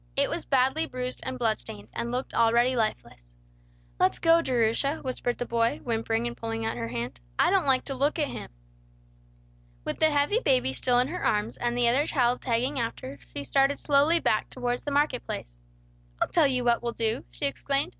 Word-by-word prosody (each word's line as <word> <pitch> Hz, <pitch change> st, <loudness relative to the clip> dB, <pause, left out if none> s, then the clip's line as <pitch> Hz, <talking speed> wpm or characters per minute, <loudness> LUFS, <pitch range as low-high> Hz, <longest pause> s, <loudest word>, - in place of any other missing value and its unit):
It 280 Hz, 0 st, +1 dB
was 335 Hz, -, -3 dB
badly 270 Hz, +4 st, +2 dB
bruised 255 Hz, -1 st, -4 dB
and 260 Hz, 0 st, -5 dB
blood 225 Hz, -3 st, +1 dB
stained, 105 Hz, +1 st, -9 dB
and 235 Hz, -, -3 dB
looked 255 Hz, +2 st, -3 dB
already 235 Hz, +2 st, +3 dB
lifeless. 120 Hz, -, -3 dB, 0.7 s
"Let's 125 Hz, -, +3 dB
go, 330 Hz, 0 st, +4 dB
Jerusha," 255 Hz, +1 st, +1 dB
whispered 250 Hz, -2 st, -2 dB
the 245 Hz, -, -3 dB
boy, 230 Hz, 0 st, +1 dB
whimpering 225 Hz, -1 st, -1 dB
and 240 Hz, 0 st, -3 dB
pulling 225 Hz, 0 st, -4 dB
at 225 Hz, -, -1 dB
her 115 Hz, -, -4 dB
hand. 120 Hz, -, -5 dB, 0.2 s
"I -, -, +4 dB
don't -, -, +2 dB
like 260 Hz, -1 st, +3 dB
to 275 Hz, -, -3 dB
look 280 Hz, +4 st, 0 dB
at 300 Hz, -3 st, +1 dB
him." -, -, -7 dB, 1.4 s
With -, -, -3 dB
the 315 Hz, -, +5 dB
heavy 295 Hz, +9 st, +2 dB
baby 255 Hz, -, +2 dB
still 245 Hz, -, +1 dB
in 250 Hz, +2 st, +2 dB
her 360 Hz, -, -5 dB
arms, 210 Hz, +1 st, 0 dB
and 240 Hz, 0 st, -2 dB
the 240 Hz, -1 st, +3 dB
other 265 Hz, +6 st, +3 dB
child 250 Hz, -4 st, +1 dB
tagging 255 Hz, +3 st, 0 dB
after, 140 Hz, -, -5 dB, 0.2 s
she 140 Hz, -, -3 dB
started 275 Hz, -, +2 dB
slowly 295 Hz, +4 st, +3 dB
back 215 Hz, -, 0 dB
towards 245 Hz, -1 st, -3 dB
the -, -, -1 dB
market 285 Hz, -3 st, +1 dB
place. -, -, -6 dB, 0.7 s
"I'll -, -, 0 dB
tell 325 Hz, -4 st, +4 dB
you 255 Hz, -2 st, 0 dB
what 240 Hz, -1 st, +2 dB
we'll 235 Hz, 0 st, -3 dB
do," 225 Hz, +2 st, -1 dB
she -, -, -4 dB
exclaimed. 275 Hz, 0 st, 0 dB
250 Hz, 200 wpm, -27 LUFS, 230-280 Hz, 1.4 s, the